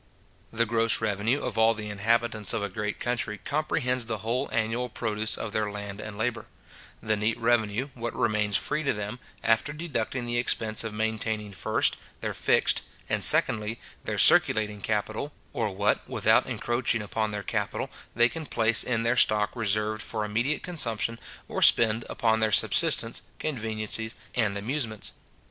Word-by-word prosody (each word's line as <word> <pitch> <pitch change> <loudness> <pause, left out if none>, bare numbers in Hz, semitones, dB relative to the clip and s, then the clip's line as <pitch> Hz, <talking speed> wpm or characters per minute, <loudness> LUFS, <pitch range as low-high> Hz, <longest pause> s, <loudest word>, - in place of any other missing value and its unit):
The 115 +1 +1
gross 115 0 +3
revenue 110 +5 0
of - - -3
all 115 +1 +4
the 105 -1 -6
inhabitants 110 +1 0
of 110 -3 -2
a 100 - -3
great 105 +2 -4
country 120 -3 -2
comprehends 130 -4 -1
the 110 -2 -2
whole 125 +4 -1
annual 115 +2 -1
produce 110 -1 -2
of 115 - -5
their 110 -1 -1
land 100 0 -7
and 105 -1 -8
labour; 115 0 -2 0.6
the 110 - +1
neat 105 +2 -1
revenue, 115 +2 0
what 120 -1 -5
remains 105 -2 +1
free 150 +1 0
to 140 - 0
them, 105 +3 -5 0.2
after 115 +5 +2
deducting 130 -6 -3
the 120 0 -1
expense 110 -2 -1
of 115 - -4
maintaining 110 -1 -2
first, - - 0 0.2
their - - -3
fixed, - - +2 0.3
and, - - 0
secondly, 110 +1 +6 0.2
their - - -3
circulating 105 -1 +4
capital, 110 +7 -2 0.2
or 115 -3 -1
what, 100 +2 -1
without - - +3
encroaching 120 -2 -1
upon 110 +1 -2
their 105 -1 -5
capital, - - -3 0.2
they 120 0 +5
can 160 +3 -7
place 115 0 +3
in 115 -2 -1
their 115 +2 +1
stock 105 -3 +3
reserved 110 -1 0
for 110 -2 -3
immediate 120 +8 -1
consumption, 115 -9 -1 0.3
or - - -4
spend 115 0 +5
upon 110 -1 +1
their 110 -1 +1
subsistence, - - +3 0.2
conveniencies, 110 -4 -2 0.2
and 105 -4 0
amusements. 110 0 -4
110 Hz, 160 wpm, -27 LUFS, 105-120 Hz, 0.6 s, secondly